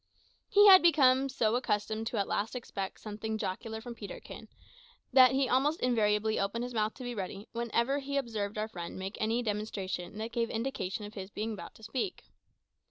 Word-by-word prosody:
He 410 -2 +7
had 375 -1 +10
become 275 -5 +5
so 225 -3 +1
accustomed 220 -2 -1
at 200 - 0
last 210 +2 -1
to - - -3
expect 195 -5 -5
something 220 +1 -4
jocular 220 +3 -4
from 240 +1 -7
Peterkin, 210 -3 -9 0.7
that 255 -1 +8
he 270 0 +2
almost 280 +6 +2
invariably 220 -3 +2
opened 200 +4 -1
his 250 0 -5
mouth 215 -1 0
to 255 - -9
be 245 0 -4
ready 200 0 -5
whenever 235 +4 0
he 280 0 -3
observed 215 -6 -2
our 215 +1 -1
friend 175 -6 -7
make 190 +2 -5
any 225 +3 +1
demonstration 205 -4 -3
that 220 +2 -4
gave 230 -1 0
indication 225 -4 -3
of 205 - -9
his 190 -2 -7
being 215 +2 -3
about 175 -5 -9
to 220 - -17
speak. 265 - -3
220 Hz, 185 wpm, -31 LUFS, 210-250 Hz, 0.7 s, had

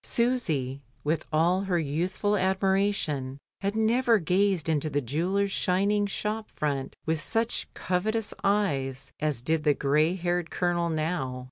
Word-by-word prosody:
Susy 160 - 0 0.2
with 155 +1 0
all 170 +4 +3
her 190 -3 0
youthful 175 +7 0
admiration 190 -8 0 0.2
had 200 +1 -2
never 230 +2 +3
gazed 185 -1 +1
into 155 -1 +1
the 145 - 0
jeweller's 175 - 0
shining 200 +3 +2
shop 210 +2 -3
front 140 -3 -2
with 160 -1 0
such 225 +1 -1
covetous 215 +5 -1
eyes 140 -10 0
as 150 -6 -1
did 160 +2 +1
the 150 -2 +3
grey 150 +5 +2
headed 175 -1 -1
Colonel 175 -1 0
now. 155 -5 -2
175 Hz, 135 wpm, -27 LUFS, 150-200 Hz, 0.2 s, all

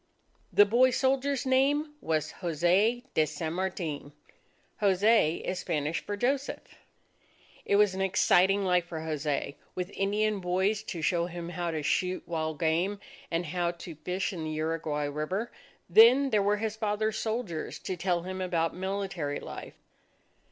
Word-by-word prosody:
The 205 - +7
boy 240 +5 +4
soldier's 270 +1 +1
name 285 +4 +2
was 155 -2 -1
Jose 180 +8 +2
de 155 - +3
San 155 +2 -4
Martin. 170 -6 -3 0.7
Jose, 200 -3 +4
is 180 - -4
Spanish 155 -2 -1
for 205 - -4
Joseph. 270 +5 -2 0.9
It 200 - +2
was 205 -1 +4
an 190 - -3
exciting 195 +1 +3
life 180 -2 +2
for 160 -2 -5
Jose, 150 -3 -2 0.2
with 180 +1 -3
Indian 210 +1 0
boys 190 +3 0
to 170 -6 -6
show 170 +1 +1
him 170 -1 -6
how 175 -1 -3
to 155 -2 -3
shoot 185 +5 0
wild 160 -2 -2
game, 170 +5 +1 0.3
and 170 +1 -1
how 175 +1 -1
to 170 0 -7
fish 180 +6 -3
in 165 -3 -5
the - - -3
Uruguay 155 -1 -2
River. 155 +10 -3 0.4
Then, 245 +9 +7
there 210 - +3
were 205 +1 +2
his 215 0 -2
father's 215 0 -1
soldiers 220 -8 -3
to 185 - -4
tell 175 -1 0
him 185 +1 -5
about 170 -3 0
military 190 -6 -3
life. - - -8
185 Hz, 150 wpm, -29 LUFS, 165-210 Hz, 0.9 s, The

